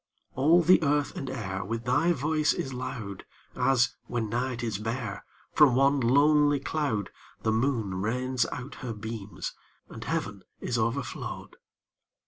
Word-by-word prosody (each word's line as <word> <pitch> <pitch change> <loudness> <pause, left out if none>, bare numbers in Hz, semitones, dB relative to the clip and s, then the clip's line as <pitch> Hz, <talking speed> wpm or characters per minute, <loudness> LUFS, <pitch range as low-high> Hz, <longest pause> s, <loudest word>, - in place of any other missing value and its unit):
All 160 +6 +4
the 180 +3 +6
earth 145 -1 +1
and 135 - -4
air 95 -6 -3
With 115 +3 -4
thy 130 +8 +3
voice 155 0 +1
is 135 - -4
loud, 120 -6 -5 0.3
As, 130 -3 +3
when 115 -3 -2
night 120 +1 -2
is 110 -4 -2
bare, 110 -1 -4 0.3
From 140 -5 +6
one 140 +2 +4
lonely 145 +3 +4
cloud 135 -8 -2 0.3
The 110 - +2
moon 110 -6 0
rains 125 +3 0
out 135 +3 -6
her 125 -3 -4
beams, 105 -1 -6 0.4
and - - -8
heaven 100 0 -3 0.2
is 120 - -1
overflow'd. 120 +3 -3
125 Hz, 140 wpm, -28 LUFS, 110-140 Hz, 0.4 s, the